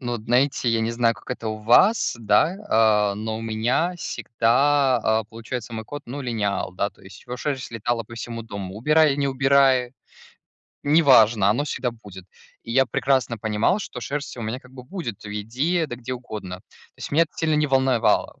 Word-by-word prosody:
Но 120 -2 -3
знаете, 125 +4 +1
я 115 - +1
не 115 +1 -1
знаю, 115 -1 +2
как - - -13
это 115 -3 -4
у 110 - -3
вас, 125 - +4
да, 115 - +2
а, 105 -2 +3
но 110 +1 -4
у - - -7
меня 120 +11 0
всегда, 130 0 +1
а, 110 0 +1
получается, 115 +2 -7
мой 110 0 -5
кот, 145 +5 -8
ну, 140 +4 -6
линял, 105 -7 -2
да. 100 +2 -1
То - - -25
есть 95 +1 -14
его 125 0 -5
шерсть 135 -1 -4
летала 115 +1 -2
по 115 - -12
всему 115 0 -6
дому, 100 -3 -7
убирай, 150 +4 +3
не 140 -1 0
убирай- 135 -2 +3 0.9
неважно, 120 -9 +5
оно 145 +7 0
всегда 130 -4 -2
будет, 100 -6 -13 0.4
и 115 - -9
я 135 0 +4
прекрасно 125 -1 0
понимал, 110 - 0
что 125 - -7
шерсть 140 +1 -5
у 120 - -6
меня, 115 +4 -4
как 125 - -18
бы, 125 -1 -11
будет 125 - -6
в - - -7
еде, 130 - -1
да 120 - -6
где 125 +1 -5
угодно, 105 -7 -7
то - - -22 0.3
есть - - -7
меня 165 +3 +4
это - - -22
сильно 160 -1 0
не 150 - +2
волновало. 130 -3 +1
120 Hz, 195 wpm, -23 LUFS, 110-135 Hz, 0.9 s, неважно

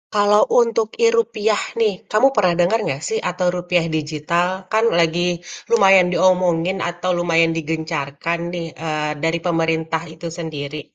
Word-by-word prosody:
kalau 205 0 +4 0.2
untuk 230 -2 0 0.2
e-rupiah 220 - +1 0.2
nih, 215 -2 +3 0.2
kamu 215 +5 +5
pernah 185 -4 +3
denger 185 +6 +2
nggak 135 +1 -3
sih 220 - -1
atau 180 0 -2
rupiah 175 -1 0
digital 155 +3 -1 0.2
kan 220 +1 +3
lagi 170 +1 +1 0.4
lumayan 195 -5 +5
diomongin 180 0 +2
atau 175 +1 -4
lumayan 165 -1 +2
digencarkan 160 0 -3
nih, 170 -2 -4 0.2
eee, 155 -1 -2
dari 165 +1 0
pemerintah 160 -1 0
itu 165 +2 -7
sendiri. 150 -2 -5
175 Hz, 135 wpm, -20 LUFS, 160-195 Hz, 0.4 s, kamu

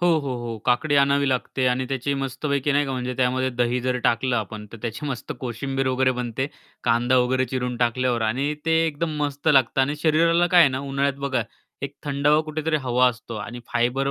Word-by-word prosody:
हो, 175 - +2
हो, 140 -4 -3
हो, 120 -2 -5
काकडी 145 +4 +2
आणावी 140 0 +3
लागते 130 0 -1
आणि 125 +1 0
त्याची 135 +1 -1
मस्तपैकी 140 +1 -1
नाही 145 +1 +3
का, 135 - -3
म्हणजे 125 0 -3
त्यामध्ये 130 0 +1
दही 125 0 0
जर 125 0 0
टाकलं 120 +2 +2
आपण, 105 -1 -4
तर 115 - -8
त्याची 115 +4 -4
मस्त 130 -4 -4
कोशिंबीर 135 +2 -3
वगैरे 130 0 +2
बनते. 125 +2 -2 0.4
कांदा 120 +2 +3
वगैरे 130 +1 +2
चिरून 125 0 -3
टाकल्यावर 120 0 +1
आणि 135 +7 0
ते 165 - +2
एकदम 160 +1 -2
मस्त 145 -1 -2
लागतं. 135 -2 +4
आणि 140 +3 +1
शरीराला 165 +2 +3
काय 175 0 +5
आहे 145 - +7
ना, 130 - -2
उन्हाळ्यात 140 0 -1
बघा, 135 -3 0 0.4
एक 140 0 -4
थंडावा 145 +1 +2
कुठेतरी 155 0 -1
हवा 125 +1 +4
असतो 120 -1 -7
आणि 120 +3 -6
फायबर 135 +3 +1
130 Hz, 195 wpm, -23 LUFS, 125-140 Hz, 0.4 s, आहे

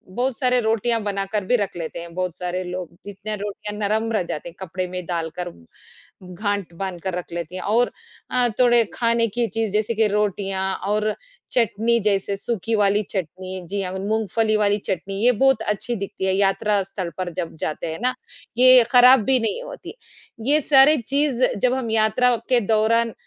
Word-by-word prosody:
बहुत 250 -1 0
सारे 250 -1 +2
रोटियाँ 225 +1 +1
बनाकर 200 0 -2
भी 245 - +3
रख 200 -4 -3
लेते 165 0 -5
हैं, 170 0 -9
बहुत 180 -2 -2
सारे 180 +1 -3
लोग। 180 -1 -5 0.2
जितने 205 +1 -5
रोटियाँ 210 0 -6
नरम 215 +2 0
रह 210 -4 +1
जाते 165 -1 -5
हैं, 170 - -17
कपड़े 185 0 -4
में 180 0 -6
डालकर 170 +1 -3 0.8
गाँठ 200 -1 -2
बाँध 185 -3 -4
कर 190 - -2
रख 180 - -7
लेती 170 +1 -5
हैं, 185 - -4
और 235 +4 +2 0.4
अ, 250 -1 +3
थोड़े 240 -2 +5
खाने 230 -1 +1
की 235 +2 -1
चीज़, 225 -2 -2
जैसे 215 +2 +1
कि 220 0 +3
रोटियाँ 200 -2 -1 0.2
और 210 +1 +1 0.4
चटनी, 235 0 +2
जैसे 200 -2 0
सूखी 225 +2 -2
वाली 205 0 +2
चटनी, 185 0 -5
जी 200 0 -1
हाँ, 185 0 -4
मूँगफली 215 +2 0
वाली 205 -1 +2
चटनी, 195 0 -4
ये 250 - +7
बहुत 270 -4 +4
अच्छी 210 +3 -2
दिखती 195 -2 -4
है, 190 - +2
यात्रा 200 +1 +2
स्थल 185 -2 -5
पर 185 -1 -3
जब 165 - -7
जाते 155 +2 -4
हैं - - -7
ना। 255 0 +1 0.4
ये 255 0 +8
खराब 250 -1 +7
भी 260 +3 +3
नहीं 230 - -2
होती। - - -9 0.5
ये 300 +2 +4
सारे 280 +2 +6
चीज़, 270 +1 0
जब 250 +5 +2
हम 255 -4 -2
यात्रा 225 +3 +3
के 250 -2 +4
दौरान 225 +1 +2
210 Hz, 185 wpm, -22 LUFS, 190-235 Hz, 0.8 s, ये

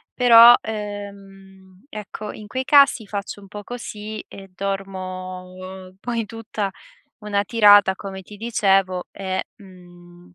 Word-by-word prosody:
Però, 240 -1 +9
ehm, 195 -2 -9
ecco 210 -1 -7
in 210 - -11
quei 260 +4 -3
casi 280 -6 +5
faccio 200 0 -5
un 200 - -14
po' 205 +1 -9
così 215 -2 -7
e 195 -1 -12
dormo 185 -1 -6
poi 230 0 -3
tutta 220 -2 -5 0.5
una 205 -2 -1
tirata 205 -3 +6
come 190 -1 -8
ti 205 +3 -13
dicevo 195 -4 +1
e, 190 -1 -4
mhmm 175 -3 -17
200 Hz, 120 wpm, -22 LUFS, 190-215 Hz, 0.5 s, Però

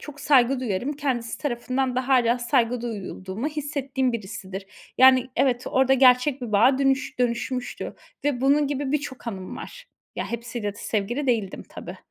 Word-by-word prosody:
çok 295 -1 -10
saygı 265 -2 +4
duyarım. 245 +3 -2
Kendisi 260 -6 -2
tarafından 255 -1 -1
da 255 +1 -1
hâlâ 245 -2 +4
saygı 240 -1 +1
duyulduğumu 205 0 -5
hissettiğim 275 -4 -2
birisidir. 190 -3 -6 0.3
Yani, 260 -1 +6
evet 255 -1 +2
orada 265 0 +3
gerçek 255 +1 +4
bir 230 -3 -5
bağa 250 +6 +5
dönüş 270 -1 +1
dönüşmüştü 245 +1 -2 0.3
ve 275 -4 0
bunun 285 +2 +3
gibi 280 -1 -2
birçok 280 -4 -3
anım 190 -5 -5
var. - - -10 0.3
Ya, - - -3
hepsiyle 235 -3 -4
de - - -13
sevgili 235 +8 -2
değildim 220 -7 0
tabii. - - -9
250 Hz, 155 wpm, -24 LUFS, 235-270 Hz, 0.3 s, Yani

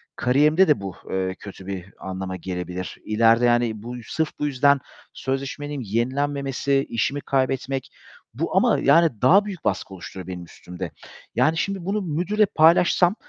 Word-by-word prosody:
kariyerimde 150 +8 +4
de 150 -9 +3
bu, 95 -2 -6
eee, 95 0 -1
kötü 95 -2 -10
bir 95 -3 -5
anlama 95 0 -5
gelebilir. 90 0 -5
İleride, 115 +2 +4
yani, 120 -3 +1
bu, 120 +1 -6
sırf 160 +6 -1
bu 150 - 0
yüzden 140 0 +3 0.3
sözleşmenin 140 +1 -4
yenilenmemesi, 135 +4 0
işimi 135 +5 -1
kaybetmek. 135 0 -1 0.4
Bu - - -2
ama - - +4
yani 145 -6 +4
daha 195 +11 +6
büyük 190 -5 -7
baskı 95 0 -1
oluşturuyor 95 -1 -9
benim 90 -1 -6
üstümde. 90 +1 -8 0.4
Yani 155 +7 +3
şimdi 190 0 -2
bunu 205 +2 -1
müdürle 180 +6 +1
paylaşsam 175 +3 +4
130 Hz, 145 wpm, -23 LUFS, 100-150 Hz, 0.4 s, daha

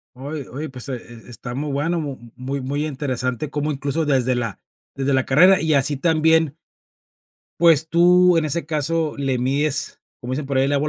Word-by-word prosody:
Oye 140 +2 -6
oye, 150 +5 -6
pues, 130 +1 -6
e 130 - -2
está 120 0 -12
está 120 +1 -7
muy 145 +2 -3
bueno, 165 +5 -1 0.4
muy 135 +2 -4
muy 145 +3 -2
interesante, 130 -2 -3
como 150 +1 -2
incluso 140 +3 -2
desde 130 -3 +2
la 115 -5 -3 0.4
desde 140 0 0
la 130 -1 +2
carrera, 180 +8 +5
y 160 -1 +1
así 140 +1 +2
también 160 -1 +2 1.0
pues, 160 -2 +5
tú, 180 +1 +5
en 155 - +1
ese 155 0 -2
caso, 160 +1 -1
le 135 -3 -1
mides, 140 +3 -1 0.2
como 125 +1 -4
dicen 145 +1 -3
por 135 -1 0
ahí, 135 - +3
el 140 - 0
agua 145 +2 +1
145 Hz, 185 wpm, -21 LUFS, 130-155 Hz, 1.0 s, carrera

